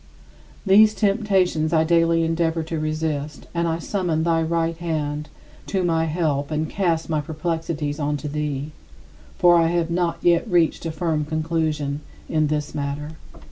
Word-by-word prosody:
These 210 +2 +6
temptations 195 -7 +1
I 160 -1 +4
daily 165 0 +3
endeavor 165 0 0
to 160 0 -4
resist 155 -1 -3
and 170 0 0
I 165 0 0
summon 170 -2 -1
thy 165 -1 +2
right 165 0 0
hand 150 -3 -3 0.4
to 190 -2 0
my 165 -2 +1
help 150 -3 -1
and 155 0 -1
cast 170 -2 0
my 155 -2 0
perplexities 155 -1 -3
onto 150 0 -2
thee, 150 0 -3 0.7
for 175 -1 +6
I 165 -1 +4
have 170 0 0
not 175 -1 0
yet 175 +5 +3
reached 170 -2 +2
a - - -2
firm 155 -1 -1
conclusion 155 -2 -1 0.3
in 155 -1 +1
this 150 -1 -2
matter. 145 +1 -3
160 Hz, 150 wpm, -23 LUFS, 150-170 Hz, 0.7 s, These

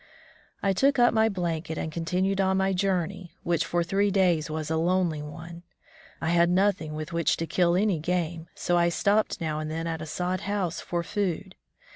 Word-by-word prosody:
I 195 -1 +3
took 275 +8 +3
up 240 -1 +5
my 220 0 +4
blanket 165 -4 -3
and 160 - -3
continued 185 +4 0
on 190 0 +2
my 190 0 +1
journey, 180 -2 -1
which 170 -2 +1
for 175 0 0
three 195 +4 +1
days 180 -6 +2
was 155 0 -3
a - - +1
lonely 170 -1 +1
one. 165 +3 -9 0.6
I 160 - -1
had 170 0 +4
nothing 180 -4 +1
with 155 +2 -6
which 170 -2 +1
to 165 - -2
kill 170 +2 +2
any 195 -3 +2
game, 170 0 -2
so 175 - +1
I 170 0 +3
stopped 205 +5 +1
now 155 -2 -2
and 155 0 -4
then 165 +1 -3
at 165 -1 -3
a 155 - -6
sod 180 +3 -2
house 190 -3 -2
for 170 -1 -2
food. 190 0 -2
175 Hz, 195 wpm, -27 LUFS, 160-190 Hz, 0.6 s, up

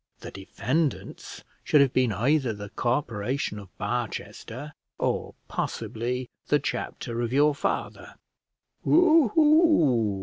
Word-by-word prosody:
The - - -8
defendants 130 - -3 0.2
should 150 - +4
have 140 -2 +4
been 125 -3 +2
either 130 +3 +1
the 105 0 -8
Corporation 120 -2 -2
of 100 -3 -12
Barchester, 120 +4 -5 0.2
or - - -2
possibly 125 +3 -3 0.2
the - - +4
chapter 120 0 -4
of 120 -1 -2
your 145 +3 +4
father." 145 - -4 0.7
"W 330 -4 +5
hoo!" 215 - +3
125 Hz, 110 wpm, -26 LUFS, 110-150 Hz, 0.7 s, W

